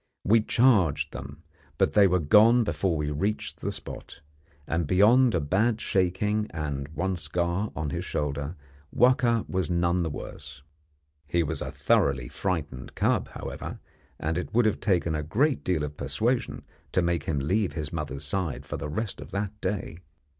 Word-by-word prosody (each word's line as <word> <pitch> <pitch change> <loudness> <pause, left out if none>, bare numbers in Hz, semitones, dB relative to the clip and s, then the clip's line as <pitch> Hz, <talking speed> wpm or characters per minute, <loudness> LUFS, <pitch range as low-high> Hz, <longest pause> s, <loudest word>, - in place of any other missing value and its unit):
We 110 +3 +4
charged 110 - +3
them, 70 +4 -8 0.3
but - - +2
they 100 -2 +6
were 90 0 +3
gone 110 +9 +5
before 95 -6 0
we 75 0 -2
reached 100 +9 -2
the - - -2
spot; - - -8 0.4
and 85 -1 -1
beyond 110 - +5
a - - +2
bad 105 +10 +1
shaking 105 +3 0
and 70 -4 -4
one 90 +5 -2
scar 85 +4 -1
on 75 -2 -3
his - - -3
shoulder 75 +2 -3 0.4
Wahka 120 -2 +3
was 95 -1 -1
none 85 +1 +1
the 80 - -1
worse. 70 -2 -8 0.6
He 85 +3 +1
was 75 -1 -3
a - - -4
thoroughly - - +1
frightened 75 -6 -4
cub, - - +1
however, - - -6 0.4
and 80 +2 -1
it - - -6
would 120 -1 +4
have 110 - +1
taken 90 -5 +1
a 75 - -1
great 130 - +1
deal 85 -5 0
of 75 0 -5
persuasion 110 - -1 0.3
to 90 - +3
make 85 -3 0
him 75 - -1
leave 90 +5 0
his 75 -2 -4
mother's 75 -3 -4
side 85 0 -2
for - - -5
the 75 - -5
rest 105 +7 -3
of - - -9
that 100 0 -2
day. 95 -4 -3
85 Hz, 170 wpm, -27 LUFS, 75-105 Hz, 0.6 s, they